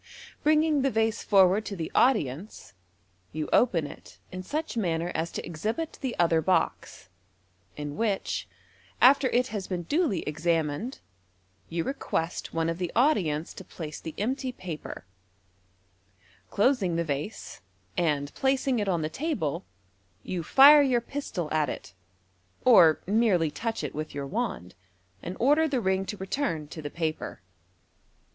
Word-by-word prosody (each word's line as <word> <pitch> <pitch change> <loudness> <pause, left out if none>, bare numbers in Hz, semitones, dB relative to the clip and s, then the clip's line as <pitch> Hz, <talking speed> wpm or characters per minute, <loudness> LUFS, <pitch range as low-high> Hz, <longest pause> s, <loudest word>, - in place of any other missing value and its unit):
Bringing 305 -1 +3
the 275 - +2
vase 225 -1 0
forward 195 +1 +4
to 200 - -5
the 165 -3 -5
audience, 185 - 0 0.6
y>u 155 -1 -2
open 180 -11 +3
it 145 - -12
in 185 0 -5
such 305 +12 -4
manner 175 -5 -1
as 165 +2 -2
to - - -4
exhibit 215 - -4
the 260 -3 -2
other 165 -2 +3
box, 180 - -1 0.7
in 145 -1 -5
which, 215 -4 -1 0.5
after 270 +1 +6
it 250 0 +1
has 205 -3 -4
been 180 -2 -3
duly 290 - 0
examined, 160 - -1 0.7
you 165 0 -1
request 175 -9 -3
one 165 0 -1
of 165 +1 -2
the 180 -2 -2
audience 180 - +2
to - - -10
place 155 -3 -8
the 160 - -8
empty 260 +4 -2
paper 175 - -8 1.4
Closing 205 -6 +2
the 170 - +1
vase, 150 - -5 0.3
and 145 -5 0
placing 265 -2 +1
it 205 -2 -1
oh 180 - +2
the 155 -2 -1
table, 165 - -3 0.6
you 180 -2 -3
fire 280 - +8
your 260 -4 +3
pisto1 225 - -5
at 155 -3 +1
it, 90 - -7 0.7
or 175 -11 +7
merely 195 -6 +2
touch 225 -2 -3
it 150 - -4
with 155 -1 -5
your 140 -1 -3
wand, 200 - -3 0.5
and 180 +2 -6
order 295 +6 +4
the 275 -4 0
ring 190 -2 0
to 210 - -5
return 190 - -2
to 155 - -8
the 145 - -5
paper. 160 0 -4
185 Hz, 145 wpm, -27 LUFS, 160-250 Hz, 1.4 s, fire